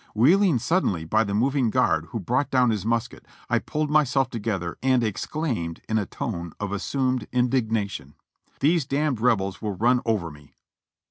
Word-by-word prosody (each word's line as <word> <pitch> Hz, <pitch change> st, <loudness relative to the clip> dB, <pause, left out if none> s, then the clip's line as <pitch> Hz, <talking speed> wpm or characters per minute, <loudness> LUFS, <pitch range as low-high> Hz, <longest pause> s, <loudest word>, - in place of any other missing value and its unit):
Wheeling 165 Hz, -, +4 dB
suddenly 115 Hz, -, 0 dB
by 110 Hz, +7 st, +2 dB
the 100 Hz, -2 st, -3 dB
moving 130 Hz, +2 st, +2 dB
guard, 80 Hz, -5 st, +1 dB
who 115 Hz, -, -5 dB
brought 125 Hz, +8 st, 0 dB
down 125 Hz, -3 st, +3 dB
his 105 Hz, -1 st, -2 dB
musket, 115 Hz, -1 st, -2 dB, 0.3 s
I -, -, +3 dB
pulled 150 Hz, -1 st, -3 dB
myselt 135 Hz, -3 st, +2 dB
together 100 Hz, -7 st, -3 dB
and 130 Hz, -2 st, +2 dB
exclaimed 110 Hz, -, -3 dB
in 110 Hz, 0 st, +1 dB
a 100 Hz, -, -3 dB
tone 85 Hz, -7 st, -5 dB
of 105 Hz, -1 st, -3 dB
assumed 130 Hz, +4 st, -1 dB
indignation: 115 Hz, -, -1 dB, 0.5 s
"These 155 Hz, 0 st, +2 dB
d 145 Hz, +2 st, 0 dB
Rebels 110 Hz, -6 st, 0 dB
will 105 Hz, -3 st, -3 dB
run 120 Hz, +5 st, +2 dB
over 105 Hz, -8 st, -1 dB
me!" 75 Hz, -1 st, -17 dB
115 Hz, 160 wpm, -25 LUFS, 100-135 Hz, 0.5 s, Wheeling